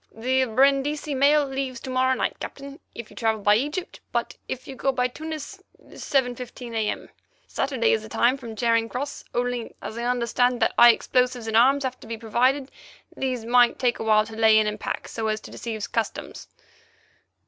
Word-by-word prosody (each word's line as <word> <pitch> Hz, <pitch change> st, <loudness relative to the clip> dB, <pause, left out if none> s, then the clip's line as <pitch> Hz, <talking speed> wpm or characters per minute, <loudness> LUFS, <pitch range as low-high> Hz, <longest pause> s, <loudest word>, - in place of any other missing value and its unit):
"The 260 Hz, +3 st, +1 dB
Brindisi 275 Hz, +5 st, +2 dB
mail 285 Hz, +2 st, +4 dB
leaves 270 Hz, -2 st, -4 dB
to 260 Hz, -, -6 dB
morrow 260 Hz, 0 st, +2 dB
night, -, -, -2 dB
Captain, 280 Hz, +2 st, -8 dB, 0.2 s
if 235 Hz, -2 st, -8 dB
you -, -, -15 dB
travel 220 Hz, -2 st, 0 dB
by 205 Hz, -, +5 dB
Egypt, 295 Hz, -, -2 dB
but -, -, -2 dB
if 255 Hz, -, -5 dB
you 270 Hz, -, -7 dB
go 270 Hz, +1 st, 0 dB
by 250 Hz, -1 st, +1 dB
Tunis, 315 Hz, +7 st, -7 dB, 0.2 s
7.15 250 Hz, -2 st, -3 dB
a.m. 220 Hz, -2 st, -2 dB, 0.4 s
Saturday 265 Hz, -, 0 dB
is 110 Hz, -, +1 dB
the 110 Hz, -, -10 dB
time 240 Hz, -, +3 dB
from 235 Hz, -5 st, -9 dB
Charing 230 Hz, 0 st, +1 dB
Cross. 280 Hz, +5 st, -5 dB
Only, 245 Hz, -1 st, -2 dB
as 225 Hz, -, -7 dB
I 235 Hz, -, -3 dB
understand 245 Hz, 0 st, +1 dB
that -, -, +2 dB
high 240 Hz, -, +9 dB
explosives 250 Hz, 0 st, +1 dB
and 220 Hz, 0 st, -2 dB
arms 270 Hz, +5 st, +5 dB
have 255 Hz, -1 st, -3 dB
to -, -, -13 dB
be 230 Hz, 0 st, -5 dB
provided, 255 Hz, +5 st, +1 dB, 0.4 s
these 255 Hz, -4 st, -3 dB
might 245 Hz, 0 st, +4 dB
take 245 Hz, -2 st, 0 dB
awhile 215 Hz, -1 st, +3 dB
to 220 Hz, 0 st, -10 dB
lay 220 Hz, -1 st, +5 dB
in 215 Hz, -, +4 dB
and 210 Hz, 0 st, -3 dB
pack -, -, -4 dB
so 225 Hz, -1 st, -3 dB
as 215 Hz, 0 st, -1 dB
to -, -, -12 dB
deceive 220 Hz, -3 st, -5 dB
customs." 230 Hz, -1 st, -4 dB
245 Hz, 190 wpm, -24 LUFS, 225-270 Hz, 0.4 s, high